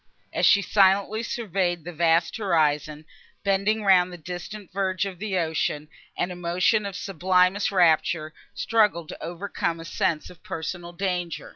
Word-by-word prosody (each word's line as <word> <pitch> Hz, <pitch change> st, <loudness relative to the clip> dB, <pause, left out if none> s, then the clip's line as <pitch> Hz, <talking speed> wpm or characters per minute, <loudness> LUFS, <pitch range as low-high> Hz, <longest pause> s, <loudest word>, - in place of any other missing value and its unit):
As -, -, +3 dB
she 200 Hz, -, +5 dB
silently 200 Hz, +2 st, +3 dB
surveyed 190 Hz, -7 st, -2 dB
the 175 Hz, +2 st, -7 dB
vast 165 Hz, 0 st, +2 dB
horizon, 155 Hz, -6 st, 0 dB, 0.4 s
bending 200 Hz, +2 st, +1 dB
round 185 Hz, -2 st, +4 dB
the 175 Hz, -, -8 dB
distant 180 Hz, +4 st, -8 dB
verge 190 Hz, 0 st, 0 dB
of 190 Hz, -3 st, -7 dB
the 200 Hz, -2 st, -2 dB
ocean, 160 Hz, -2 st, -1 dB, 0.3 s
an 180 Hz, -, -1 dB
emotion 180 Hz, +5 st, +1 dB
of 195 Hz, -, -7 dB
sublimest 185 Hz, +1 st, +1 dB
rapture 165 Hz, -3 st, +2 dB, 0.2 s
struggled 200 Hz, -5 st, +1 dB
to -, -, -8 dB
overcome 170 Hz, -1 st, -3 dB
a 165 Hz, -, -8 dB
sense 165 Hz, -1 st, -1 dB
of 180 Hz, -, -17 dB
personal 170 Hz, +2 st, -5 dB
danger. 175 Hz, -2 st, -3 dB
180 Hz, 145 wpm, -25 LUFS, 165-195 Hz, 0.4 s, she